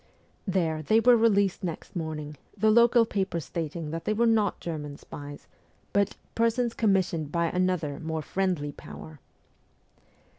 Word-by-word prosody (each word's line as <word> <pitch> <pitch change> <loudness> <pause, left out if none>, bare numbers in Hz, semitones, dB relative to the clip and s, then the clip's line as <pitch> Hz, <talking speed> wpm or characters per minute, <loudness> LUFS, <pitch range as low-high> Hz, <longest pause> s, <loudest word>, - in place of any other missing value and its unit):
There 165 -5 0
they 215 +9 +3
were 245 +1 +6
released 200 -4 +2
next 170 0 -5
morning, 155 -3 -4 0.2
the 215 +2 +4
local 235 +1 +6
paper 190 -5 -1
stating 160 0 -4
that 165 0 -5
they 215 - +1
were 235 +2 +3
not 225 -3 +2
German 150 -4 -5
spies 145 0 -10 0.5
but 200 0 +2 0.2
'persons 230 +1 +1
commissioned 185 -9 +1
by 170 0 +1
another 180 -6 0
more 160 -1 -3
friendly 180 -6 -1
power.' 75 - -11
175 Hz, 140 wpm, -27 LUFS, 155-215 Hz, 0.5 s, were